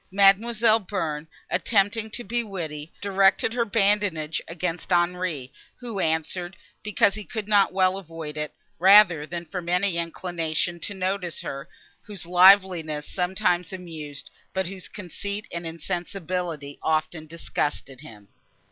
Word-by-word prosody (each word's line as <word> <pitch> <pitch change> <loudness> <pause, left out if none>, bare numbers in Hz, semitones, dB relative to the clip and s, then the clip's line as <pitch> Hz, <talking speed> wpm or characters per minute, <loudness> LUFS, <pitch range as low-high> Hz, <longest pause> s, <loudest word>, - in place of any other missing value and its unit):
Mademoiselle 215 +3 +4
Bearn, 165 -7 -3 0.2
attempting 205 +4 +1
to 240 +3 -4
be 235 +3 -1
witty, 165 -7 -6
directed 195 +2 +3
her 240 -1 +1
badinage 200 -7 +1
against 175 +1 -4
Henri, 175 -6 0 0.2
who 235 -5 -6
answered, 170 +2 -1 0.2
because 205 -1 +2
he 215 +1 -6
could 210 +2 -5
not 205 -2 +4
well 185 0 +2
avoid 165 -4 -8
it, 150 0 -3 0.3
rather 180 -5 +7
than 170 0 -5
from 170 +1 -5
any 180 0 +2
inclination 170 0 -2
to 200 +4 -4
notice 185 -2 -2
her, 140 +3 -6 0.3
whose 200 -5 -7
liveliness 180 -4 +5
sometimes 180 -2 0
amused, 160 -6 -8 0.2
but 190 0 0
whose 185 +1 -6
conceit 200 +2 -6
and 170 0 -4
insensibility 170 -2 -4
often 155 0 -1
disgusted 145 -4 -3
him. 105 -9 -13
180 Hz, 130 wpm, -25 LUFS, 160-200 Hz, 0.3 s, rather